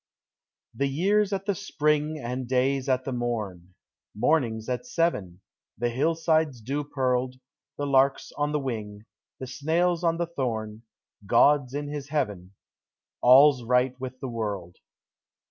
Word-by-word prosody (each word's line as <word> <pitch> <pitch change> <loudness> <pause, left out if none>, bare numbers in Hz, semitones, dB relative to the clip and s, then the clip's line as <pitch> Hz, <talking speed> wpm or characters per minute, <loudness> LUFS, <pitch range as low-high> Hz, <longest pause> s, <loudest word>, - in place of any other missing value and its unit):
The 140 +5 0
year's 200 +9 +1
at 195 -1 -2
the 200 - +1
spring 150 -2 0
And 125 -1 -4
day's 130 +2 +1
at 130 0 +1
the 135 - -3
morn; 105 -8 -4 0.4
Morning's 115 -3 +1
at 125 - -3
seven; 105 - -1 0.4
The 120 +3 0
hillside's 155 0 +1
dew 140 +6 -3
pearled; 130 -2 -1 0.4
The 145 - -2
lark's 135 0 +2
on 145 0 -2
the 150 - +1
wing; 110 -6 -5 0.3
The 130 - -5
snail's 165 +7 0
on 165 -1 +2
the 170 - 0
thorn; 115 -9 -4 0.5
God's 135 +3 +4
in 145 0 -3
his 145 -1 -6
heaven 100 -11 -3 0.7
All's 130 +2 +7
right 125 +2 +2
with 130 0 -7
the 135 - -3
world. 105 -7 -4
130 Hz, 140 wpm, -26 LUFS, 120-150 Hz, 0.7 s, All's